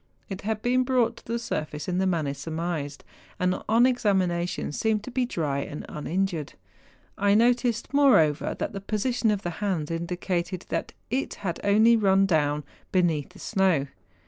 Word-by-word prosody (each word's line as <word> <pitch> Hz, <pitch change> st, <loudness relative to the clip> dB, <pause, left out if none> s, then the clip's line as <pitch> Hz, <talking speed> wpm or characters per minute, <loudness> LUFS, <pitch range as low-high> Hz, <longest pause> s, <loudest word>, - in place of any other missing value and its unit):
It 195 Hz, -1 st, -5 dB
had 215 Hz, +1 st, -3 dB
been 255 Hz, +1 st, +3 dB
brought 245 Hz, -3 st, +1 dB
to -, -, -15 dB
the 230 Hz, +1 st, -1 dB
surface 155 Hz, -10 st, -4 dB
in 180 Hz, 0 st, 0 dB
the 190 Hz, -, +2 dB
manner 160 Hz, -6 st, 0 dB
surmised, 155 Hz, 0 st, -4 dB, 0.4 s
and 180 Hz, 0 st, 0 dB
on 230 Hz, +3 st, +5 dB
examination 190 Hz, -, +1 dB
seemed 215 Hz, +6 st, 0 dB
to 255 Hz, -, -7 dB
be 250 Hz, 0 st, 0 dB
dry 150 Hz, -, -1 dB
and 145 Hz, +1 st, -6 dB
uninjured. 165 Hz, 0 st, -2 dB, 0.7 s
I 200 Hz, 0 st, +4 dB
noticed, 240 Hz, +1 st, +2 dB
moreover, 245 Hz, -, +4 dB
tliat -, -, -3 dB
the 195 Hz, -, -6 dB
position 220 Hz, +3 st, 0 dB
of 205 Hz, -2 st, 0 dB
the 175 Hz, -, -2 dB
hands 175 Hz, -7 st, -1 dB
indicated 175 Hz, +2 st, -2 dB
that -, -, -3 dB, 0.2 s
it 265 Hz, +3 st, -1 dB
had 170 Hz, -3 st, -2 dB
only 220 Hz, +3 st, +5 dB
run 195 Hz, -2 st, +4 dB
down 150 Hz, -4 st, +1 dB, 0.3 s
beneath 170 Hz, -6 st, +1 dB
the -, -, -17 dB
snow. 190 Hz, -9 st, +1 dB
190 Hz, 165 wpm, -26 LUFS, 165-225 Hz, 0.7 s, on